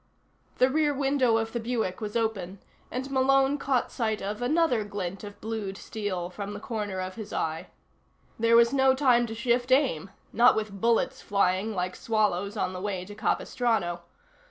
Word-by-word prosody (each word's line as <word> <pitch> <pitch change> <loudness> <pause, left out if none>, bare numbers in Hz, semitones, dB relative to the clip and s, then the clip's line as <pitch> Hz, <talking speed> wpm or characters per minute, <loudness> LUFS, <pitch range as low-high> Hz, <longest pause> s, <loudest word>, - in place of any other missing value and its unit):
The 255 - +5
rear 295 0 +2
window 270 -4 +2
of 225 0 -2
the 235 - -1
Buick 225 -5 -2
was 210 0 -5
open, 205 -5 -1 0.3
and 260 +3 -4
Malone 270 +1 +3
caught 265 -3 0
sight 220 -4 -1
of 205 +3 -4
another 255 -3 +2
glint 200 -2 -5
of 205 0 -9
blued 215 -3 -4
steel 190 -6 -4
from 200 +2 -6
the - - -6
corner 210 -4 -4
of 185 0 -4
his 215 -2 -7
eye. 160 0 -2 0.7
There 230 +1 +4
was 235 +2 +5
no 265 -1 +4
time 250 -3 +3
to 225 - -6
shift 245 +2 0
aim 255 - +2 0.2
not 240 +2 +6
with 210 -3 -4
bullets 230 0 +1
flying 200 +2 +1
like 180 0 -2
swallows 210 -2 0
on 185 - -1
the 185 - -6
way 190 -3 -3
to 205 - -10
Capistrano. 215 -4 -1
220 Hz, 175 wpm, -27 LUFS, 200-245 Hz, 0.7 s, not